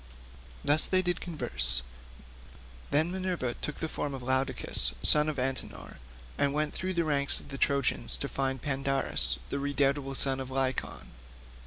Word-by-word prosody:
Thus 150 +2 +5
did 185 -1 +2
they 175 - +2
converse. 150 - -2 1.1
Then 160 +4 +2
Minerva 180 -9 -2
took 150 - -3
the 160 - -3
form 145 -2 -4
of 130 - -8
Laodocus, 130 0 +1
son 150 0 +6
of 155 - -4
Antenor, 130 0 -4 0.4
and 140 0 +1
went 150 0 0
through 185 0 -3
the 170 - +2
ranks 140 -3 0
of - - -14
the 135 - -6
Trojans 140 - +1
to - - -3
find 135 -2 -2
Pandarus, 135 - +1
the 140 - -1
redoubtable 140 -1 0
son 135 -1 +2
of 130 -1 -5
Lycaon. 130 -1 -2
140 Hz, 155 wpm, -29 LUFS, 130-150 Hz, 1.1 s, son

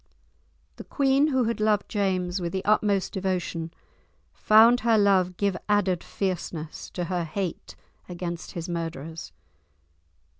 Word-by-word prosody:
The - - -8
queen, 275 +1 +2
who 260 -4 +1
had 230 0 -2
loved 215 -1 +1
James 185 -3 -1
with 170 -1 -3
the 190 - -3
utmost 205 -2 +2
devotion, 180 -3 -2 0.6
found 225 +3 +6
her 230 -2 +3
love 190 -3 +3
give 200 -2 0
added 200 -4 +1
fierceness 170 -5 -4
to 180 - -2
her 175 0 -2
hate 175 +2 -5 0.3
against 175 -1 -6
his 170 -1 -5
murderers. 165 - -5
185 Hz, 125 wpm, -26 LUFS, 175-210 Hz, 0.6 s, found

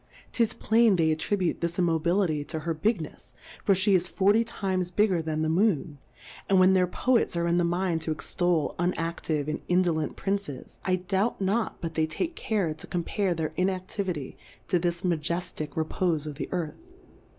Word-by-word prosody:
'Tis 230 -3 +2
plain 225 -2 +3
they 160 -2 +3
attribute 180 +3 0
this 170 0 -2
Immobility 170 -2 +1
to 160 +1 -5
her 165 +1 -1
Big 190 +2 0
nefs, 125 -4 -12 0.3
for 195 - +4
fhe 195 +2 +4
is 180 -1 +3
forty 205 +5 +3
times 190 -5 -2
bigger 185 -2 +2
than 155 -1 -2
the - - +1
Moon, 165 -4 +1 0.5
and 195 -1 +5
when 185 +1 +6
their 185 -1 +3
Poets 240 +2 +1
are 170 - +1
in 170 +1 +2
the - - +2
mind 175 -1 0
to 160 - -2
extol 160 +2 0
unaftive 165 -4 -1
and 155 - -3
indolent 175 -4 +1
Princes, 195 -9 -4
I 185 - +2
doubt 190 +5 -1
not 200 +4 -1
but 165 -2 -4
they 160 -1 +1
take 330 - -3
care 205 -9 -1
to 155 - -10
compare 180 +1 -1
their 160 -1 -3
Inactivity 185 -4 -2 0.3
to 180 - +3
this 175 +1 -1
Majeftick 170 -2 -2
Repofe 160 0 0
of 150 - -5
the 140 - -5
Earth. 170 -4 -3
175 Hz, 175 wpm, -27 LUFS, 160-190 Hz, 0.5 s, when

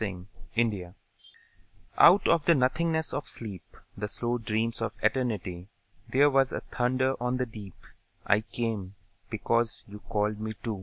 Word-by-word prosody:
The 90 -4 -4 0.3
Call 100 -6 0 1.0
Out 190 +4 +7
of 165 -3 +3
the 170 - +6
nothingness 160 +4 +1
of 145 - -3
sleep, 100 -6 -7 0.2
The 105 +1 -3
slow 120 +3 -1
dreams 115 +1 -1
of 115 -1 -2
Eternity, 105 -7 -1 0.4
There 145 +2 +5
was 135 -1 +3
a - - -3
thunder 130 +1 0
on 125 +1 0
the 125 - 0
deep: 105 -5 -10 0.5
I 105 +1 +4
came, 110 -4 -4 0.3
because 115 +1 0
you 105 +1 -10
called 105 -1 -1
to 110 +1 -4
me. 100 - -7
115 Hz, 150 wpm, -28 LUFS, 105-130 Hz, 1.0 s, Out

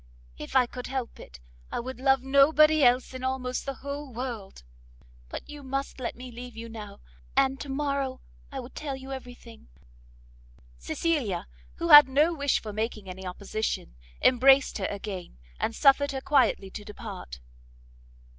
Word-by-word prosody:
if 150 - -8
I 260 -1 +6
could 250 +1 -7
help 260 -3 -4
it, 65 +1 -12 0.3
I - - -2
would 255 +1 -6
love 270 -1 +3
nobody 300 +3 +5
else 250 +1 +3
in 255 0 -7
almost 260 0 -2
the 275 - -3
whole 280 0 -5
world. 230 - -6 0.7
But - - -7
you 295 -1 -9
must 275 0 -4
let 245 - -3
me 250 +1 -9
leave 240 0 -9
you 230 0 -7
now, 210 -3 -9 0.4
and 270 0 +3
to 285 - -7
morrow 275 -2 -1 0.3
I 270 -1 -4
will 250 +1 -11
tell 285 -3 -5
you 265 0 -9
every 250 -2 -7
thing." 230 -2 -15 1.1
Cecilia, 225 - -1 0.3
who - - -3
had 295 -2 +11
no 300 +6 +3
wish 285 -3 +1
for 215 -2 -7
making 215 -1 -3
any 185 0 -7
opposition, 195 - -3 0.3
embraced 265 0 +5
her 190 - -1
again, 195 - -6 0.2
and 225 - -1
suffered 285 0 +4
her 265 - -3
quietly 260 -9 +2
to 210 - -7
depart. 205 - -8
255 Hz, 165 wpm, -27 LUFS, 220-275 Hz, 1.1 s, had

